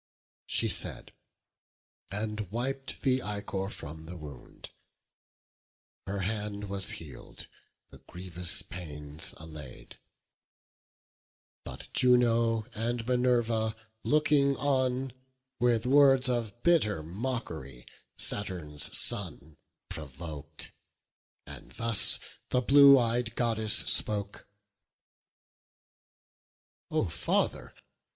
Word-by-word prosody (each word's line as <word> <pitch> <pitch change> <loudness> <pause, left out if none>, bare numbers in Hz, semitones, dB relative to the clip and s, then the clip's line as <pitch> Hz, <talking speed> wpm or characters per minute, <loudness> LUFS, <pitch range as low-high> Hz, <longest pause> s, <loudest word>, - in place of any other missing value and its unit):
She - - 0
said; - - -3 1.0
and 105 -1 -5
wip'd 135 +3 -4
the 130 -1 +1
ichor 100 -2 -5
from 80 -3 -10
the 90 +2 -8
wound; 75 -5 -12 1.4
The 100 0 -4
hand 105 0 -4
was 100 -1 -2
heal'd, 70 -7 -10 0.5
the - - -15
grievous 90 -1 -1
pains 75 -3 -6
allay'd. 75 -6 -12 1.6
But - - -11
Juno 115 -3 +2
and 115 +1 -3
Minerva, 120 -3 0 0.3
looking 145 -2 +2
on, 130 -2 -1 0.5
With 120 -1 +1
words 135 -1 +4
of 120 -2 -3
bitter 105 - +2
mock'ry 80 - -6 0.3
Saturn's 85 -8 +2
son 80 -1 +4 0.3
Provok'd: 75 0 -7 0.7
and - - -13
thus 115 -2 +6 0.3
the 125 - +1
blue 140 +1 +7
ey'd 115 -1 -2
Goddess 110 -3 +1
spoke: 100 -1 +2 2.4
"O - - -1
Father! - - -2
110 Hz, 85 wpm, -28 LUFS, 85-125 Hz, 2.4 s, blue